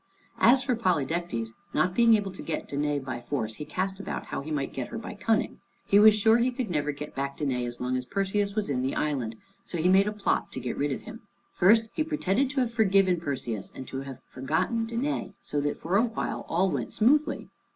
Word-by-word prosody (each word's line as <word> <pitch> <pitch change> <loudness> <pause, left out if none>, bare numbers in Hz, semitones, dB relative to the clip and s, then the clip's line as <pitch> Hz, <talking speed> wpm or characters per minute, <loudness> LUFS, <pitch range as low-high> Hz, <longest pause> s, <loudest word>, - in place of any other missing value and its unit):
As 255 +3 +6
for 255 -2 +1
Polydectes, 170 - -1 0.3
not 180 0 +2
being 230 +1 +6
able 200 -2 -1
to 185 - -9
get 160 - -4
Danæ 145 -1 -1
by 125 -2 -4
force, 115 -4 -3
he 150 - -6
cast 190 +5 -2
about 200 - -4
how - - -4
he 145 - -8
might 145 -3 -2
get 130 -2 -3
her - - -6
by 225 - -6
cunning. 225 -1 0 0.3
He 200 - +5
was 215 0 +8
sure 220 +2 +4
he 245 +2 +3
could 245 -5 -3
never 150 -2 0
get 150 +1 -8
back 140 0 -3
Danæ 125 -4 -1
as 120 0 -7
long 125 +1 -1
as 125 0 -3
Perseus 200 +1 0
was 215 -2 0
in 130 -3 0
the 130 +1 -1
island, 130 -7 -1 0.3
so 175 - -5
he 165 +2 +2
made 190 +2 +5
a - - 0
plot 210 -1 -1
to - - -4
get 125 -1 -3
rid 145 0 0
of 135 - -3
him. 225 +1 -10 0.3
First 215 +5 +5
he 310 - 0
pretended 275 - 0
to 270 -1 0
have 235 -2 -1
forgiven 195 -5 +3
Perseus, 130 - -4
and 130 - -7
to 135 - -4
have 135 -2 -8
forgotten 160 - -1
Danæ, 235 -3 -2
so 145 - -2
that 145 0 -1
for 180 +4 0
a 225 - +4
while 230 -1 -3
all 185 +3 +2
went - - -3
smoothly. 290 +6 +2
180 Hz, 230 wpm, -27 LUFS, 140-220 Hz, 0.3 s, was